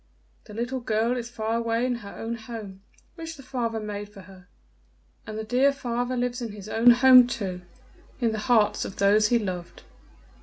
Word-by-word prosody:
"The 210 - -11
little 245 +3 -2
girl 230 +1 0
is 235 -2 -5
far 225 0 -2
away 230 +1 0
in 255 - 0
her 200 -4 -10
own 225 +1 -4
home, 220 -4 -8 0.3
which 325 -2 -8
the 275 - -12
father 235 -4 -3
made 205 -1 -6
for 205 -1 -13
her, 190 0 -16 0.8
and 215 0 -6
the 220 - -3
dear 250 +5 +3
father 245 -2 -3
lives 245 0 -2
in 230 -3 -5
his 205 -1 -10
own 225 +2 +4
home 250 0 +8
too 190 -7 -4 0.6
in 235 -3 +1
the 220 - -3
hearts 220 -4 +3
of - - -7
those 205 +2 +4
he 240 - +3
loved." 185 -5 -5
230 Hz, 190 wpm, -26 LUFS, 210-245 Hz, 0.8 s, home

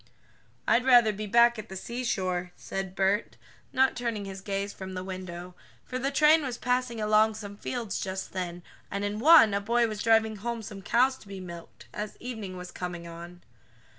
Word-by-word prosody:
"I'd 245 - +4
rather 240 -4 +6
be 210 +1 -5
back 235 +2 +5
at 215 - -8
the 190 - -7
seashore," 185 -6 -2
said 190 -1 -5
Bert, 195 +3 +1 0.3
not 265 0 +3
turning 230 -4 -3
his 195 -1 -7
gaze 200 +1 -3
from 190 -1 -7
the 185 - -4
window, 185 -1 -7 0.3
for 255 - -4
the 270 +2 0
train 305 +3 +5
was 255 -4 -4
passing 250 -2 -1
along 215 0 +3
some 205 -2 -8
fields 230 -1 -4
just 190 0 -4
then, 175 -2 -4 0.3
and 200 +1 -2
in 205 +1 -2
one 295 -6 +8
a 200 - 0
boy 235 +3 +2
was 215 -2 -5
driving 220 -1 +3
home 235 +2 -4
some 205 -2 -8
cows 255 +6 +2
to - - -16
be 195 -1 -7
milked, 170 -2 -10
as 210 0 -5
evening 220 -7 -6
was 180 0 -8
coming 175 -1 -6
on. 170 +1 -10
210 Hz, 190 wpm, -28 LUFS, 190-235 Hz, 0.3 s, one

